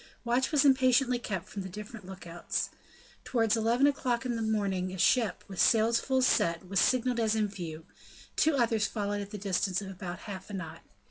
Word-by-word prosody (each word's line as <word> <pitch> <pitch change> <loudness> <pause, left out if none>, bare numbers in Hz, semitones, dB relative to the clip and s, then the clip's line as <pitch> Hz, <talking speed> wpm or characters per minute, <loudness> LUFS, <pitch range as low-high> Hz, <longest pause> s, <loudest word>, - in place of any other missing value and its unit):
Watch 245 +3 +1
was 295 -2 +3
impatiently 255 -2 +4
kept 190 -6 -4
from 200 - -6
the 190 - -6
different 210 +1 -9
look 190 -1 -9
outs. 170 0 -3 0.5
Towards 225 -3 +1
eleven 230 +4 +2
o'clock 255 -4 0
in 245 -2 -1
the 230 - -3
morning 200 -4 -1
a 190 - -6
ship, 220 +4 +2
with 190 -3 -2
sails 230 0 +4
full 260 0 +1
set, 170 -7 +2
was 195 0 +1
signalled 250 +1 +2
as 220 -1 +2
in 215 -1 +1
view; 165 -5 -7 0.5
two 315 -1 +3
others 225 -4 +2
followed 205 -1 -2
at 200 - -7
the 210 - -6
distance 190 -2 0
of 195 -1 -7
about 180 -1 -7
half 190 -2 -8
a - - -8
knot. 165 -4 -6
215 Hz, 200 wpm, -30 LUFS, 190-240 Hz, 0.5 s, impatiently